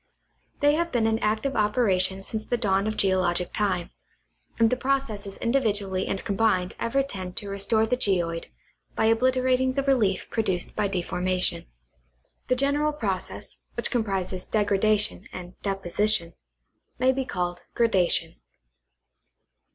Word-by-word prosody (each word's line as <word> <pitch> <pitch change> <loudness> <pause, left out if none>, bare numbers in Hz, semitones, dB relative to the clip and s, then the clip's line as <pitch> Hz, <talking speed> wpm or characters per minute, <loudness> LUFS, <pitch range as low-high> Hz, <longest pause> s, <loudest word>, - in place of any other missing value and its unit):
They 290 0 +5
have 335 +2 0
been 240 -3 +1
in 225 0 +1
active 220 +6 0
operation 195 -3 +2
since 220 +2 -4
the 245 - -1
dawn 200 -3 +1
of 215 - -2
geologic 185 -2 +1
time, 190 -5 0 0.7
and 225 -1 +4
the - - +3
processes 240 -7 -2
individually 205 -7 0
and 195 - -3
combined 195 -3 +1
ever 270 +4 +1
tend 185 -8 -6
to 200 - -2
restore 200 +3 +2
the 250 - +1
geoid 175 -8 0 0.5
by - - +1
obliterating 255 +2 +2
the 275 +1 0
relief 230 -9 +1
produced 190 -6 -1
by 205 - +1
deformation. 185 - -1 0.8
The 255 - +2
general 285 +3 +1
process, 200 -10 -3 0.2
which - - -1
comprises 195 -6 -1
degra 205 -2 +1
dation 215 0 +2
and 180 0 -8
deposition, 195 -1 0 0.6
may 260 +1 +3
be 265 0 -1
called 175 -6 -3
gradation. 180 -7 +2
210 Hz, 135 wpm, -26 LUFS, 185-245 Hz, 0.8 s, They